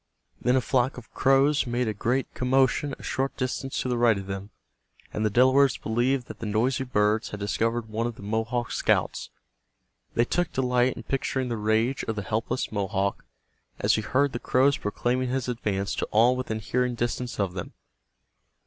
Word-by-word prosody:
Then 125 - +3
a 130 - +3
flock 125 +1 +1
of 120 -4 -12
crows 135 +1 +3
made 120 0 0
a 110 - 0
great 120 +6 -1
commotion 130 +2 +1
a - - -14
short 135 +1 -2
distance 130 +1 -2
to - - -3
the 125 -1 0
right 115 -3 +4
of 95 - -6
them, 95 +1 -5 0.6
and 110 - -1
the 110 - +3
Delawares 130 +4 +4
believed 120 +3 0
that - - -10
the 110 - -4
noisy 125 +6 +1
birds 105 -3 +1
had 105 - -6
discovered 115 +3 -1
one 110 +2 -2
of 120 - -5
the - - -12
Mohawk 110 +3 -1
scouts. - - 0 0.9
They 120 - +3
took 175 +6 0
delight 125 -1 +2
in - - -7
picturing 130 -1 -1
the 120 - -1
rage 110 +5 +1
of 115 - -2
the 105 - -3
helpless 110 +5 -2
Mohawk 100 -1 -1 0.5
as - - +2
he 110 - +1
heard 140 +6 +1
the 120 - -3
crows 135 +3 +3
proclaiming 125 +5 -1
his 130 -1 -1
advance 105 -5 -2
to - - -1
all 120 +4 +4
within 125 -4 -3
hearing 125 +3 0
distance 120 0 -3
of 95 -3 0
them. 85 -2 -6
120 Hz, 185 wpm, -26 LUFS, 110-130 Hz, 0.9 s, right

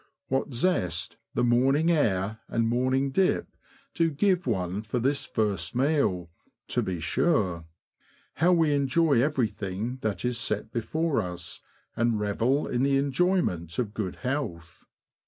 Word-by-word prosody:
What 135 +2 0
zest 105 - 0 0.2
the - - +2
morning 135 +7 +3
air 110 - +1
and 115 -1 0
morning 130 +3 +1
dip 190 +6 +2 0.5
do 165 -1 +2
give 180 +3 +1
one 95 -3 -1
for 110 +3 -3
this 135 +4 0
first 100 -6 -1
meal, 125 - +1 0.4
to - - +1
be 90 -2 -3
sure! 85 - +1 0.7
How 175 +3 +4
we 165 -4 +3
enjoy 140 -1 +3
everything 115 -4 -1
that 110 +2 -2
is 125 -1 -1
set 105 -1 -2
before 145 +4 0
us, 90 -3 -7 0.3
and 115 -2 +1
revel 115 +7 +1
in 120 - -1
the 135 0 +3
enjoyment 135 - 0
of 110 -4 -2
good 100 -5 -3
health 125 - -4
120 Hz, 135 wpm, -27 LUFS, 100-145 Hz, 0.7 s, How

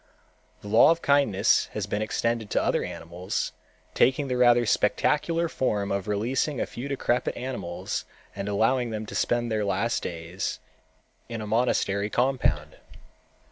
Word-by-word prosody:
The - - -10
law 110 +7 +6
of 165 +1 +1
kindness 120 -8 +3
has 105 -3 -2
been 105 +1 -2
extended 115 0 -1
to - - +1
other - - +1
animals, 85 +2 -4 0.4
taking 135 +2 +2
the 125 - 0
rather 120 -1 +5
spectacular 150 +11 +1
form 105 -9 -1
of 100 0 -2
releasing 120 +7 0
a - - 0
few 125 +4 -7
decrepit 125 -3 -1
animals 120 -9 -4 0.3
and 100 +1 -4
allowing 120 +4 +2
them 110 -1 -4
to - - -9
spend 120 -1 0
their 110 -1 0
last 100 +4 0
days 85 +2 -4 0.7
in 115 -1 -4
a 110 - -5
monastery 105 -3 +1
compound. 130 +3 0
115 Hz, 145 wpm, -26 LUFS, 100-130 Hz, 0.7 s, law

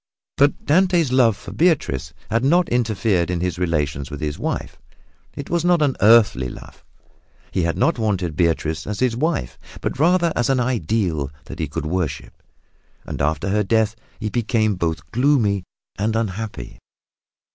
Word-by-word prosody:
But 140 0 +2
Dante's 175 -2 +3
love 120 -5 +4
for - - -10
Beatrice 75 - +1 0.2
had 115 +2 +1
not 170 +6 +3
interfered 110 -7 +1
in 90 -1 -1
his 90 0 -2
relations 75 -5 -1
with 70 -1 -7
his 75 -1 -3
wife. - - -4 0.6
It 140 - -6
was 170 -1 +1
not 175 -3 +3
an 140 -3 +1
earthly 105 - +5
love. - - -12 0.7
He 95 - 0
had 85 0 -1
not 165 -6 +2
wanted 95 -7 -1
Beatrice 80 -2 0
as 105 -1 -4
his 125 -3 +1
wife, 125 - -2 0.2
but - - -4
rather 170 +1 +3
as 120 - +1
an 135 -1 +2
ideal 100 - 0 0.2
that - - -9
he - - -1
could - - -4
worship. 85 -1 -3 0.6
And - - -5
after 80 +7 0
her 105 +2 +2
death 110 +1 +1 0.2
he 110 -1 -2
became 110 -2 +1
both 85 -3 -3
gloomy 115 -8 +2 0.3
and 110 +2 0
unhappy. 110 - -4
110 Hz, 160 wpm, -21 LUFS, 85-130 Hz, 0.7 s, earthly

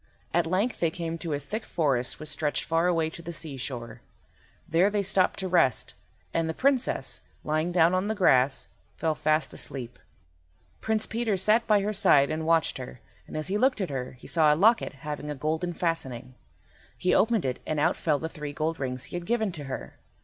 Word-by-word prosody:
At 170 -1 +2
length 195 +8 0
they 165 - +2
came 165 0 -4
to 165 -2 -3
a - - +1
thick 210 +11 -5
forest 135 -7 0
which 155 - -5
stretched 150 0 -1
far 165 +2 +1
away 165 -3 +2
to 170 - -9
the 170 0 -6
seashore. 125 -7 -6 0.7
There 170 +5 +4
they 205 -1 0
stopped 185 -1 +2
to 190 - -2
rest, 170 -9 +2 0.4
and 165 -1 0
the 160 - -3
Princess, 270 -2 0 0.2
lying 155 +3 0
down 170 0 +4
on 185 +2 +1
the 220 - -1
grass, 135 -9 +3 0.3
fell 160 -1 0
fast 155 +1 +1
asleep. 125 -3 -5 0.8
Prince 220 -1 0
Peter 225 -3 -1
sat 215 +5 +3
by 210 -2 +4
her 210 +2 -1
side 145 -7 +4
and 160 +1 -2
watched 165 -1 +2
her, - - -8 0.3
and - - -6
as 155 - -2
he 205 +2 0
looked 260 -1 +3
at 185 -6 -2
her 130 -1 -4
he 125 - -16
saw 155 -3 +4
a - - +4
locket 220 - +3
having 150 0 -4
a 150 - -3
golden 160 +5 -1
fastening. 135 -8 -3 0.6
He 180 - +1
opened 225 -6 +3
it 130 -1 -2
and 155 - -1
out 145 - +3
fell 155 -3 +1
the 160 - -4
three 150 -2 -7
gold 160 +3 -2
rings 130 -1 -3
he 125 - -8
had 175 0 -5
given 220 -4 +1
to 150 -5 -7
her. 135 - -7
165 Hz, 205 wpm, -27 LUFS, 145-185 Hz, 0.8 s, There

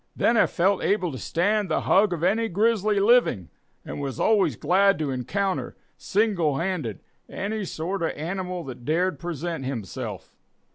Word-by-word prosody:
Then 235 - +2
I - - +5
felt 190 +2 +1
able 185 -5 +1
to 130 - -7
stand 205 - 0
the - - +1
hug 200 +1 +3
of 170 -2 -3
any 225 +5 +2
grizzly 215 +1 +2
living, 200 - +3 0.4
and - - -6
was 135 -4 -4
always 215 -3 +3
glad 195 +2 +3
to 150 -3 -2
encounter, 185 +10 -2 0.2
single 190 -9 +1
handed, 165 - -3 0.3
any 205 +1 -3
sort 180 +3 -4
of 165 - +1
an - - -6
animal 180 +2 -4
that 125 -3 -9
dared 175 +7 0
present 170 -2 -4
himself. 120 -8 -6
180 Hz, 160 wpm, -25 LUFS, 155-200 Hz, 0.4 s, I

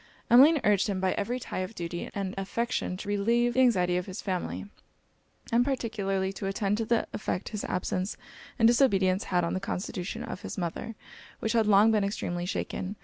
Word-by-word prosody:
Emmeline 285 +6 +8
urged 200 -2 +3
him 195 -2 -1
by 185 0 +1
every 245 +5 -2
tie 245 - -5
of 185 +4 -4
duty 175 -1 -5
and 195 -2 -2
affection 195 0 -2
to 195 - -8
relieve 230 +4 +2
the 255 - +1
anxiety 180 -8 +3
of 180 - -3
his 190 +1 -6
family, 185 -1 -3 0.9
and 235 +1 +4
particularly 200 -7 -1
to 195 - -4
attend 195 +1 0
to 225 - 0
the 235 +1 +1
effect 195 -3 -3
his 210 -2 -4
absence 185 +2 -2 0.4
and 225 -3 +5
disobedience 200 -6 +3
had 180 -1 +1
on 170 - -1
the 185 - -1
constitution 185 -1 -4
of - - -6
his - - -6
mother, 180 +5 -4 0.4
which 220 - -2
had 225 -2 +3
long 210 +2 +6
been 215 -2 +2
extremely 175 -3 -2
shaken. 190 +1 -3
200 Hz, 190 wpm, -28 LUFS, 185-230 Hz, 0.9 s, Emmeline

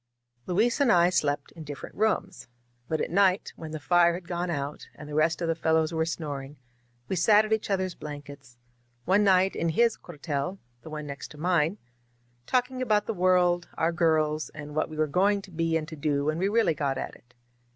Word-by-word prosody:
99 180 - -2
• - - -1
Luis 235 +5 +2
and 275 -4 +4
I 175 -1 +5
slept 145 -5 0
in 165 - -10
different 145 -2 -8
rooms. 205 -3 -1 0.4
But 160 - 0
at - - -2
night, 195 +1 +2
when 160 - -8
the 155 0 -5
fire 170 +3 +4
had 175 -1 -9
gone 175 0 -2
out 145 -3 -4
and 150 - -10
the 150 - -8
rest 160 +3 +1
of - - 0
the 165 - +2
fellows 160 0 +1
were 160 0 0
snoring, 145 -4 -5 0.5
we - - -1
sat 210 +4 +5
at 215 - 0
each 220 -1 -1
other's 190 -2 0
blankets 145 -5 -10 0.2
— 120 0 -41
one 200 +3 +4
night 190 -1 +4
in 170 - 0
his 230 +7 +2
cuartel, 150 +1 -4 0.2
the 155 - -11
one 150 -1 -6
next 140 -1 -7
to 150 - -13
mine 170 +2 +1 0.4
— 120 0 -39
^talking 255 0 0
about 215 -4 +2
the 225 - -2
world, 180 -2 +2
our 165 +1 +2
girls, 155 -2 +1
and 150 0 -8
what 155 +2 0
we 155 - -8
were 155 - +3
going 195 +7 +2
to 190 - -13
be 165 0 0
and 155 -1 -5
to 160 - -7
do 145 -1 -1
when 155 +2 0
we 195 +2 +1
really 220 -6 +3
got 140 -2 -1
at - - -4
it. 120 0 -23
165 Hz, 225 wpm, -27 LUFS, 150-185 Hz, 0.5 s, I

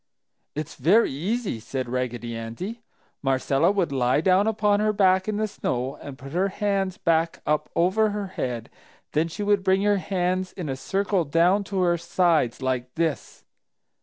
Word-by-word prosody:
"It's 155 +1 -4
very 185 - +4
easy!" 190 - -2
said 130 +3 -4
Raggedy 120 -1 -3
Andy. 115 - -6 0.4
"Marcella 135 +4 +2
would 190 -7 0
lie 130 0 +2
down 185 +5 +3
upon 210 -2 +2
her 215 0 +2
back 190 -2 +3
in 215 -1 -1
the 215 0 0
snow 130 -8 -3
and 140 -2 -8
put 140 0 -10
her 180 +5 +1
hands 195 -1 -1
back 165 -3 +1
up 150 0 0
over 195 +6 +3
her 205 -1 -3
head, 120 -9 -4 0.4
then 155 +2 +1
she 170 +5 -5
would 205 -1 +2
bring 190 +1 +3
her 205 0 +3
hands 185 -1 -1
in 170 -6 -5
a 135 - -1
circle 195 +5 0
down 170 +7 +3
to 195 -1 -2
her 175 -1 +2
sides, 165 -8 +1
like 130 -1 -2
this." 160 -2 -2
175 Hz, 170 wpm, -25 LUFS, 135-200 Hz, 0.4 s, very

